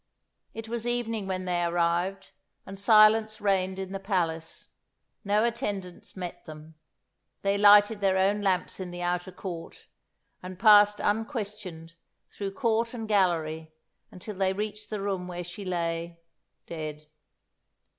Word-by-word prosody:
It 225 0 -7
was 235 +1 -4
evening 230 -4 -2
when 185 -1 -3
they 175 -1 0
arrived, 175 +3 0 0.3
and 195 0 -9
silence 215 +1 +5
reigned 190 -2 0
in 190 -1 -5
the 195 - -4
palace. 170 -5 -2 0.5
No 210 +2 +2
attendants 200 -7 -4
met 180 -2 -6
them. 155 0 -11 0.7
They 200 0 +2
lighted 205 +1 +6
their 190 -1 +2
own 200 +2 +2
lamps 190 -2 0
in 185 -1 -5
the 175 0 -6
outer 175 +1 -2
court, 180 -2 -8 0.6
and 185 0 -8
passed 210 0 +6
unquestioned 210 - -3 0.4
through 195 -1 -5
court 230 -1 0
and 225 -2 -5
gallery 160 -6 0 0.3
until 185 +4 -9
they 190 -1 +1
reached 210 +1 -5
the 210 -2 -4
room 190 -2 -2
where 175 0 -5
she 175 +4 -9
lay 170 -2 -3 0.5
dead. 155 -2 -6
195 Hz, 135 wpm, -27 LUFS, 175-210 Hz, 0.7 s, lighted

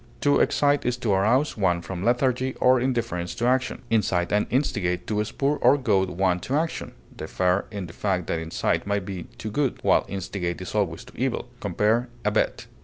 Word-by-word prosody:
To 145 0 +4
excite 145 0 +2
is 125 0 0
to 120 -4 -1
arouse 115 +10 +2
one 90 -4 +1
from 90 +2 -5
lethargy 130 +2 +1
or 130 0 +5
indifference 115 -9 -1
to 120 - -1
action. 130 +1 +1
Incite 95 -5 +1
and 105 - +2
instigate, 105 -9 0
to 105 -1 0
spur 140 +7 -1
or 145 - +5
goad 100 -8 +1
one 90 0 +1
to 130 +10 -3
action, 160 +2 -2 0.2
differ 90 +4 0
in 100 -3 -5
the 85 - -10
fact 95 -3 -1
that 85 - -1
incite 80 +4 -1
may 100 0 +1
be 95 -2 -5
to 110 - -5
good, 140 +3 0
while - - +4
instigate 95 -2 -3
is 90 - -7
always 105 +2 -1
to 125 - -16
evil 125 -1 -2
(compare 110 +5 +1 0.2
ABET). 105 +1 0
105 Hz, 185 wpm, -25 LUFS, 90-125 Hz, 0.2 s, or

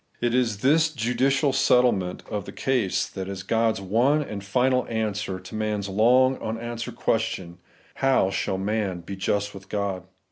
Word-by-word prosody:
It 120 -1 0
is 115 -5 +1
this 155 +5 +4
jvdidal 135 +1 +1
settle 125 -2 +4
ment 90 -2 -4
of 105 -2 -4
the - - -8
case 125 -8 0
that 95 -1 -6
is 95 -1 -5
God's 115 0 +1
one 125 +10 +2
and 105 -7 -6
final 125 +6 +1
answer 105 -4 -2
to 95 +3 -12
man's 105 -2 -2
long 125 +6 +4
unanswered 115 +1 -5
question, 110 -8 -2 0.2
' - - -30
How 115 -8 +3
shall 95 - -1
man 100 -2 -2
be 100 +4 -7
just 100 +2 -1
with 95 -1 -12
God 100 -3 -2
110 Hz, 170 wpm, -25 LUFS, 100-125 Hz, 0.2 s, this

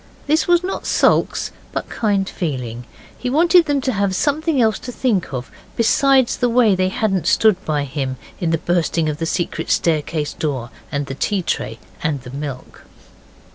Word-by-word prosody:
This 310 +2 +2
was 350 0 +4
not 380 - -4
sulks, - - +2 0.2
but - - -3
kind 200 -3 0
feeling. 125 -10 -4 0.3
He 250 - -4
wanted 335 +5 +5
them 290 -2 0
to 260 - 0
have 200 -2 0
something 305 - +1
else 220 -4 +3
to 250 - -7
think 230 - 0
of 130 -2 -5 0.2
besides 260 +2 +3
the 245 - +1
way 230 -3 +4
they 185 0 +1
hadn't 190 -4 0
stood 205 +3 +3
by 150 -2 0
him 135 -2 -3 0.2
in 175 - 0
the 165 - +2
bursting 165 -1 0
of 150 - -3
the 165 - -1
secret 175 +1 -2
staircase 155 -2 0
door 130 -6 -3 0.2
and 145 0 -1
the 135 - -5
tea 190 +7 -1
tray - - -2 0.2
and 150 -3 -1
the 125 - -9
milk. 140 -2 -7
185 Hz, 175 wpm, -20 LUFS, 150-245 Hz, 0.3 s, wanted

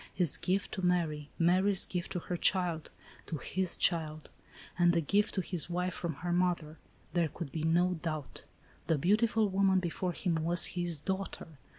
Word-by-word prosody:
His 175 -6 +3
gift 185 +3 -1
to 190 - -4
Mary; 160 -5 0
Mary's 185 +3 +3
gift 180 -1 -4
to 180 - -1
her 180 - -4
child; 175 -3 +1 0.4
to 160 - -3
his 185 +6 -2
child; 155 -3 +1 0.5
and 175 0 +4
a - - +4
gift 205 +7 +1
to 190 - +1
his 175 -3 -2
wife 180 +1 -1
from 170 -4 -4
her 175 - 0
mother. 175 -3 0 0.3
There 170 -2 +2
could 155 -2 -7
be 160 - -3
no 175 +2 +2
doubt. 155 -4 -5 0.4
The 160 - +2
beautiful 215 - +2
woman 190 0 +3
before 180 0 -2
him 170 -1 -1
was 170 +2 +3
his 175 -3 -1
daughter 190 +3 -4
175 Hz, 175 wpm, -32 LUFS, 160-185 Hz, 0.5 s, and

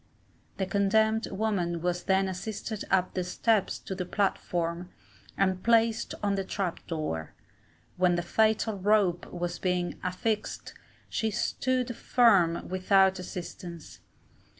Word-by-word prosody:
The 190 - 0
condemned 220 +3 +2
woman 190 -5 -1
was 175 +1 -2
then 190 0 +3
assisted 210 +3 -4
up 185 -1 +2
the 185 - -1
steps 210 +3 +1
to - - -7
the 185 -1 -3
platform, 175 -2 -1 0.5
and 190 -1 +1
placed 230 -1 +2
on 200 -1 +2
the 195 -1 -1
trap 190 -2 -3
door. 155 - -4 0.6
When 180 -1 +3
the 175 - -1
fatal 220 +2 +1
rope 190 -3 +2
was 175 0 -3
being 180 -1 -1
affixed, 210 +4 -2 0.3
she 220 - -1
stood 250 +2 -1
firm 195 -11 +3
without 190 +1 +3
assistance. 175 -2 -8
190 Hz, 125 wpm, -28 LUFS, 175-215 Hz, 0.6 s, then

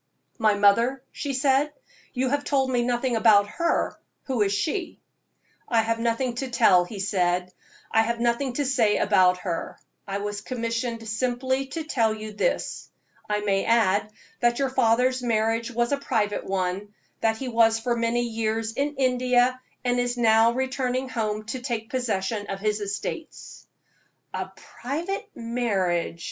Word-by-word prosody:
"My 215 -2 +4
mother?" 230 +6 +3
she 285 - -4
said 275 +2 +2 0.4
"you 255 0 0
have 285 +2 0
told 270 -3 +1
me 245 -1 +2
nothing 240 0 0
about 215 -2 +5
her. 335 +10 0 0.3
Who 260 -5 -1
is 200 -1 +2
she?" 315 - -2 0.7
"I 230 -2 +3
have 230 +1 -1
nothing 235 +2 0
to 265 +1 -3
tell," 195 -7 +5
he 200 +2 -8
said; 180 -2 0 0.4
"I 225 - +5
have 235 +1 -1
nothing 240 +2 0
to 285 +3 -1
say 240 -6 +2
about 185 -3 +4
her. 170 -3 -4 0.3
I 195 0 -2
was 205 0 -4
commissioned 230 -1 -3
simply 255 +4 -1
to 320 +4 -4
tell 230 -8 +1
you 215 0 -7
this. - - -2 0.4
I 210 0 0
may 195 -1 +1
add 215 -2 +2 0.3
that 240 0 +2
your 275 -2 0
father's 255 +1 +2
marriage 230 0 0
was 240 +1 0
a 285 - +2
private 210 -6 -1
one, 195 +2 -2 0.2
that 220 0 +1
he 265 - -5
was 225 -1 +3
for 240 +1 0
many 235 +1 +1
years 225 -1 -1
in 285 +4 -1
India, 255 -1 +2 0.2
and 245 0 +2
is 245 0 -1
now 225 -1 +5
returning 260 0 -1
home 215 -3 -2
to 260 - -4
take 235 -3 -4
possession 215 -4 -1
of 195 - -4
his 210 +1 -1
estates." 205 - -6 0.7
"A - - -3
private 345 - -5
marriage!" 200 -8 -1
230 Hz, 155 wpm, -25 LUFS, 210-255 Hz, 0.7 s, about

